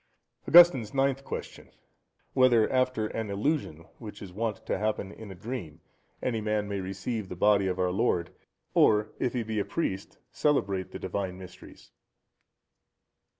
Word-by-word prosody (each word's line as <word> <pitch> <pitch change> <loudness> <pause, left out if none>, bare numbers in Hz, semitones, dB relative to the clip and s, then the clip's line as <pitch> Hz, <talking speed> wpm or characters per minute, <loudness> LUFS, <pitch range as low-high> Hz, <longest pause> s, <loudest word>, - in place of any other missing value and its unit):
Augustine's 140 -10 +7
Ninth 135 0 +1
Question.—Whether 120 - -1
after 130 -3 +1
an 110 0 -4
illusion, 100 - -2 0.2
such 105 -1 -8
as 95 - -8
is - - -16
wont 110 0 -3
to - - -1
happen 105 -2 -2
in 110 0 -10
a 95 - -8
dream, 90 -6 -6 0.4
any 115 -3 -1
man 105 -1 -1
may 100 -1 -3
receive 95 +2 -4
the - - -6
Body 100 +1 +3
of 90 -1 -1
our 90 -1 +1
Lord, 90 -1 0 0.4
or 105 0 +4
if 125 - 0
he 125 -2 -1
be 110 -1 -2
a - - +1
priest, 100 - -3
celebrate 100 -11 0
the - - -7
Divine 95 0 -4
Mysteries? 95 -1 -13
105 Hz, 150 wpm, -28 LUFS, 95-120 Hz, 0.4 s, Augustine's